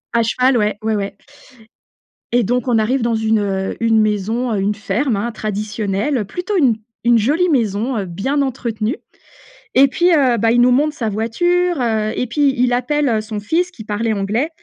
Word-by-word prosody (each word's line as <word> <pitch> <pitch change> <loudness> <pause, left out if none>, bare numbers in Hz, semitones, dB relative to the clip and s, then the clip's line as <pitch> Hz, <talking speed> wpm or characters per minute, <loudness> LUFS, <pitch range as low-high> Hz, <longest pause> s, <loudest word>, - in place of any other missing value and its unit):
À 235 - +4
cheval, 250 +3 +2
ouais, 210 -2 0
ouais, 220 0 0
ouais 200 -1 -4 1.2
et 245 - +4
donc 245 +4 -1
on 235 -3 +3
arrive 240 +4 0
dans 235 0 +1
une, 220 0 +1
heu, 195 -2 -2
une 225 -1 +3
maison, 215 +4 -1
heu, 205 - 0
une 200 +2 0
ferme, 220 +5 -1
hein, 220 +4 -2
traditionnelle, 215 +2 -2
plutôt 360 - -3
une 265 -9 +3 0.3
une 240 0 +5
jolie 300 +11 +2
maison, 230 - 0
heu, 200 - -2
bien 205 +12 -1
entretenue 235 -3 -2 0.8
et 275 +1 +5
puis 345 +6 -1
heu, 260 -5 +3
bah, 225 +1 +2
il 240 - +4
nous 250 +1 +5
montre 295 +4 +2
sa 225 -5 -2
voiture, 350 - 0
heu 220 -2 0
et 250 - -2
puis 280 +3 +1
il 245 0 +2
appelle, 280 +4 0
heu, 220 -2 +1
son 215 -1 -5
fils 345 - 0
qui 230 - -11
parlait 215 +2 -1
anglais. 215 +9 -1
230 Hz, 195 wpm, -18 LUFS, 215-265 Hz, 1.2 s, une